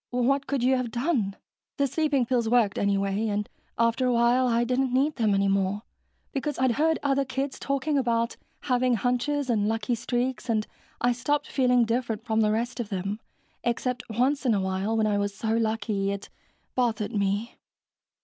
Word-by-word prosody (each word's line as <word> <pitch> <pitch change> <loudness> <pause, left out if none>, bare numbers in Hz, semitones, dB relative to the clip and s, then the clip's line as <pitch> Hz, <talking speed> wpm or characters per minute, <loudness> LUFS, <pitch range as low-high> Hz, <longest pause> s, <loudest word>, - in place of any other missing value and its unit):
"What 265 +3 +1
could 275 -4 -1
you 260 +1 +4
have 250 -2 -2
done? 235 - 0 0.4
The 280 - +2
sleeping 285 -2 +1
pills 235 -2 +1
worked, 225 -5 +3
anyway, 200 +2 +1
and 210 0 -1 0.3
after 230 +2 +2
a - - +3
while 240 +2 +3
I 235 0 +2
didn't 255 +1 0
need 275 +4 +1
them 215 -4 +2
any 195 0 +2
more, 195 +1 0 0.5
because 285 +1 -2
I'd 260 -1 +3
heard 315 +6 +2
other 275 -1 +2
kids 270 +1 -3
talking 275 +1 0
about 235 -2 0 0.3
having 250 -1 +2
hunches 250 +5 0
and 215 -4 +1
lucky 225 +2 -1
streaks 245 +2 -2
and 215 -2 +1 0.4
I 245 - +3
stopped 270 +5 -1
feeling 250 -3 +3
different 230 -1 -2
from 220 -1 +1
the 215 - +3
rest 235 +3 -2
of 230 -4 -3
them, 195 +2 -3 0.4
except 245 +1 -1
once 255 +6 +1
in 240 -5 +3
a - - +1
while, 190 +4 -1
when 220 - +2
I 205 -1 +1
was 200 0 -2
so 220 - -3
lucky 220 -3 0
it... 200 0 -4 0.5
bothered 230 -3 0
me." 205 +2 -1
235 Hz, 180 wpm, -26 LUFS, 215-260 Hz, 0.5 s, you